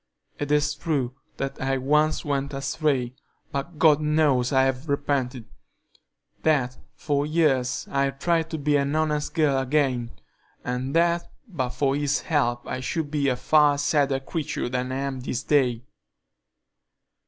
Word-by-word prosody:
"It 145 0 -3
is 150 0 +2
true 145 -5 -2 0.2
that 135 0 -4
I 135 0 0
once 150 +5 +1
went 140 -1 -2
astray, 135 -3 -1 0.4
but 150 +4 -4
God 155 -1 +5
knows 150 -5 +2
I 130 -1 +4
have 135 +3 -1
repented; 135 -4 -1 1.0
that 130 -5 +1 0.2
for 145 -2 0
years 145 -5 +1
I've 135 0 0
tried 165 +1 +1
to 160 - -3
be 145 0 +2
an 140 +1 0
honest 150 -1 0
girl 145 -4 +3
again, 130 -3 0 0.6
and 125 +3 -3
that 170 0 +2 0.2
but 140 - -2
for 135 +2 0
His 145 0 0
help 120 -6 0
I 130 - -3
should 145 +4 -3
be 145 -2 +1
a 130 - +2
far 150 +2 +4
sadder 145 -2 +1
creature 145 -1 -3
than 125 0 -2
I - - -2
am 135 -1 -3
this 125 -1 -3
day. 125 -5 +2
140 Hz, 150 wpm, -25 LUFS, 130-150 Hz, 1.0 s, God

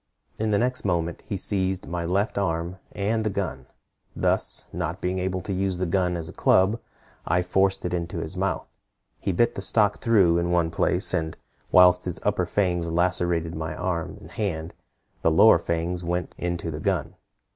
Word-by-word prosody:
In 110 0 0
the 105 - +3
next 125 +3 0
moment 85 -3 -1
he 100 - -2
seized 95 -1 0
my 85 0 -3
left 100 +5 0
arm, 85 -1 -2 0.2
and 110 +3 0
the 110 - 0
gun. 90 -11 -4 0.5
Thus, - - +2
not 85 +1 -3
being 90 0 -1
able 95 0 -2
to 95 - -4
use 95 -1 -1
the 90 - -1
gun 90 0 0
as 80 -1 -4
a - - -9
club, 100 +5 +3 0.5
I 90 +2 +2
forced 95 +1 +1
it 90 - -2
into 85 0 -3
his 80 +2 -4
mouth. 95 -2 -3 0.4
He - - -1
bit 120 +7 +2
the 95 - -5
stock 105 +1 +2
through 95 -7 +4
in 85 0 -1
one 85 -2 +1
place, - - +2
and 80 0 -1 0.3
whilst 90 0 +6
his 90 -2 -2
upper 100 -4 0
fangs 90 -4 0
lacerated 85 -1 +1
my 80 -1 -4
arm 85 -2 -3
and - - -13
hand, 85 -6 -3 0.5
the - - +3
lower 85 +4 +6
fangs 85 +1 -2
went 90 +1 -2
into 85 -1 -3
the 75 - -5
gun. - - -1
90 Hz, 185 wpm, -25 LUFS, 85-95 Hz, 0.5 s, whilst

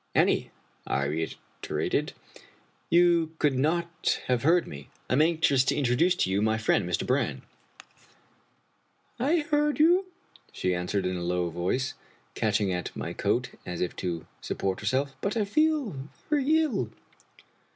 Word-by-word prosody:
" - - -40
Annie," - - +3 0.4
I 70 +1 0
reiterated, 80 +3 -3 0.4
" - - -35
you 170 -2 +3
could 150 -3 +2
not 170 +6 0
have 125 -2 +1
heard 170 +4 +4
me. 70 -1 -9 0.2
I - - -1
am 135 - +4
anxious 155 -5 +3
to - - +1
introduce 145 +7 +2
to 95 - 0
you 100 +2 +1
my 110 +1 +2
friend, 110 -5 +1
Mr. 85 - -1
Brann." - - 0 0.9
" - - -40
I 335 0 +3
heard 295 0 +1
you," 355 +5 +5 0.4
she 90 - -1
answered, 90 +2 -1
in 90 0 -1
a - - -4
low 90 0 -1
voice, 90 +11 -1 0.4
catching 105 -3 +1
at 90 - -4
my - - -4
coat - - 0
as 90 -1 -5
if 90 - -2
to 85 -3 -3 0.2
support 95 -1 -2
herself, 130 +6 -1
" - - -36
but 200 +3 -1
I 215 - +1
feel 230 - 0 0.2
very 300 +2 +3
ill." 205 - -1
130 Hz, 160 wpm, -27 LUFS, -, 0.9 s, you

